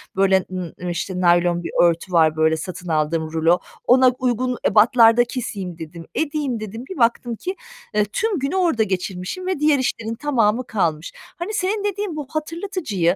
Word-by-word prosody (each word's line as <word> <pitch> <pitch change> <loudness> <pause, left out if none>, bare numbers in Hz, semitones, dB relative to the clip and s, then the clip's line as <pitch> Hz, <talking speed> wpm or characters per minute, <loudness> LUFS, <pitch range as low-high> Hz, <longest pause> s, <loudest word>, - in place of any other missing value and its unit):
böyle, 190 -1 +3
ııı, 180 -3 -5
emm 180 - -5
işte, 180 +2 -3
naylon 175 0 +3
bir - - -5
örtü 170 +1 +1
var, 160 -2 +4
böyle, 160 0 +2
satın 180 +2 -7
aldığım 155 0 0
rulo. 165 +2 +3 0.3
"Ona 255 +1 +6
uygun 250 0 0
ebatlarda 230 +2 +5
keseyim." 205 -9 -5
dedim, 165 +1 -9
"Edeyim." 290 -6 -1
dedim. 215 +2 -7
Bir 375 - -6
baktım 235 0 +1
ki, 370 - -5 0.4
eee, 210 0 +2
tüm 395 - -1
günü 275 +6 -2
orada 335 -12 +2
geçirmişim 190 - -4
ve 375 -6 -1
diğer 300 -2 +3
işlerin 230 -3 -2
tamamı 240 -3 +1
kalmış. 165 -6 -1
Hani, 350 +6 -8
senin 410 +1 -1
dediğin 405 -3 -2
bu 295 -3 -5
hatırlatıcıyı 310 - -1
220 Hz, 170 wpm, -21 LUFS, 175-290 Hz, 0.4 s, Ona